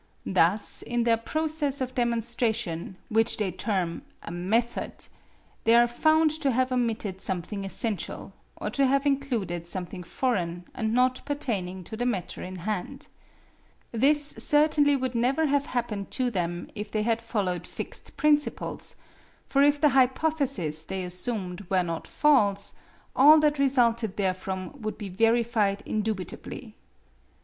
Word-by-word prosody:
Thus - - +2
in 240 0 -1
their 230 -1 +4
process 300 +3 -2
of 255 -1 -3
demonstration 230 -7 -1
which 225 0 +2
they 205 -4 -1
term 185 -2 -2 0.2
a - - -7
"method," 220 +8 -1 0.6
they 230 +1 +5
are 240 0 +7
found 310 +6 +3
to 280 - +2
have 255 +1 +1
omitted 225 -6 -1
something 195 +2 -2
essential, 195 -1 -3 0.2
or 210 - -4
to 275 +3 +2
have 275 +2 +2
included 240 - -1
something 180 +1 -4
foreign 175 -4 -2
and 220 -2 -2
not 255 +2 +2
pertaining 205 -11 -3
to 220 - -8
the 245 +2 -1
matter 195 -8 -3
in 185 +1 -6
hand. 185 +1 -4 0.8
This 290 +5 +3
certainly 295 -1 +4
would 260 -2 -2
never 255 +7 +2
have 285 -1 +1
happened 225 -5 -3
to 255 -2 +1
them 175 -3 -3
if 210 -1 -6
they 215 0 -1
had 230 0 +1
followed 200 -6 -2
fixed - - -7
principles; 300 -1 0 0.5
for 275 - +2
if 290 0 +4
the 300 - +5
hypotheses 260 - +1
they 190 -1 -3
assumed 180 0 -4
were 185 -2 +2
not 165 -1 -4
false, 205 -10 +2 0.4
all 300 +4 +8
that 295 -1 +2
resulted 235 -6 +2
therefrom 190 +5 -3
would 215 0 -4
be 205 -3 -6
verified 225 0 +2
indubitably. 215 -4 -4
230 Hz, 140 wpm, -27 LUFS, 190-265 Hz, 0.8 s, all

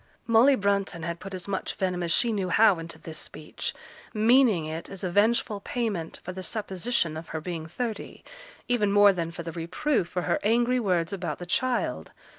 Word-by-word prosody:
Molly 240 +4 +6
Brunton 200 -5 0
had 170 +1 -3
put 195 +1 -7
as 180 0 -6
much 195 -1 -3
venom 185 -2 -1
as 170 -1 -1
she 235 +6 +3
knew 195 -3 -1
how 205 -2 +5
into 165 0 -7
this 160 -1 -8
speech, 155 - -6 0.4
meaning 220 - +4
it 160 +1 -5
as 195 -1 -7
a 180 - -1
vengeful 210 +1 +2
payment 205 -7 -3
for 180 - -5
the 185 - -6
supposition 190 -2 -1
of 160 +1 -7
her 160 - -4
being 160 -1 -5
thirty, 220 +5 -5 0.4
even 215 -5 +2
more 205 0 +7
than 170 -2 -2
for 170 0 -7
the 165 - -5
reproof 175 - -1
for 180 -1 -2
her - - +1
angry 240 +4 +2
words 180 -5 0
about 185 -3 -3
the 175 - -7
child. 250 +7 -1
190 Hz, 195 wpm, -27 LUFS, 170-225 Hz, 0.4 s, more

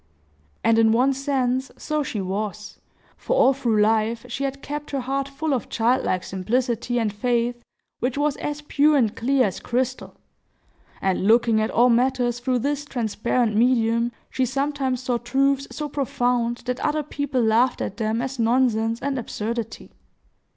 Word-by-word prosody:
And 225 0 +4
in 225 -1 +5
one 255 +4 +3
sense 265 -1 -1
so 305 -1 -2
she 235 -7 -3
was, 210 +2 -4 0.4
for - - -1
all 275 - +5
through 235 -5 0
life 225 +2 +1
she 270 +3 -3
had 275 0 -5
kept 295 +1 -5
her 275 -2 -2
heart 270 +2 -2
full 295 +2 -2
of 255 - -2
childlike 225 -5 +1
simplicity 235 +5 -1
and 215 -3 -1
faith, 240 +2 -1 0.4
which 250 +2 -1
was 290 0 +1
as 295 0 -4
pure 295 0 +3
and 225 -5 +1
clear 260 +2 +2
as 190 - -3
crystal; 255 +1 -2 0.9
and, 190 0 +1
looking 225 -1 +4
at 215 - 0
all 245 +1 +4
matters 245 0 +1
through 250 +1 0
this 285 +4 -1
transparent 235 -3 -1
medium, 235 0 +2 0.2
she 260 - 0
sometimes 265 0 -1
saw 245 -1 0
truths 275 +3 +1
so 300 - -4
profound 245 -4 -1
that 250 0 -2
other 300 0 0
people 285 -2 -2
laughed 230 +3 +3
at - - -4
them 225 +1 -1
as 260 0 -5
nonsense 230 -1 +2
and 275 -2 -1
absurdity. 225 0 -5
245 Hz, 160 wpm, -23 LUFS, 225-275 Hz, 0.9 s, in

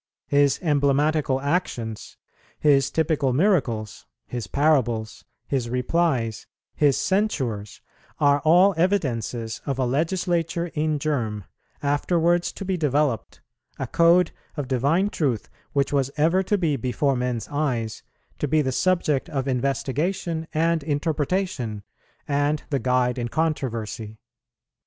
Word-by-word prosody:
His 140 -1 +3
emblematical 145 -2 +2
actions, 130 - -2 0.4
His 140 -2 +4
typical 150 -3 +1
miracles, 125 - 0 0.2
His 120 -5 -5
parables, 120 -7 +1 0.2
His 130 -4 -2
replies, 125 -3 0 0.3
His 145 -3 +3
censures, 130 - -1 0.4
all 145 -1 +4 0.3
are 170 - -8
evidences 120 - -1
of 135 -2 -1
a 130 - +1
legislature 170 +4 -1
in 155 0 0
germ, 120 -9 -2 0.4
afterwards 170 +4 +1
to 195 - -7
be 190 -1 -1
developed, 145 -6 0 0.4
a 135 - -3
code 170 +6 +4 0.3
of 145 -3 -3
divine 145 - +1
truth 130 -9 -1 0.2
which 140 0 +1
was 135 -2 +2
ever 165 +5 +3
to 205 +2 0
be 160 -6 0
before 135 +2 0
men's 125 -2 -2
eyes, 125 -7 -2 0.4
to 150 - 0
be 155 +2 +2
the 130 - -1
subject 155 -2 +1
of 140 -3 -2
investigation 145 +6 -1
and 165 +1 +1
interpretation, 145 - -1 0.4
and 145 +1 0
the 140 - +1
guide 125 -1 +1
in 120 - -2
controversy. 115 -7 -2
145 Hz, 120 wpm, -24 LUFS, 125-160 Hz, 0.4 s, His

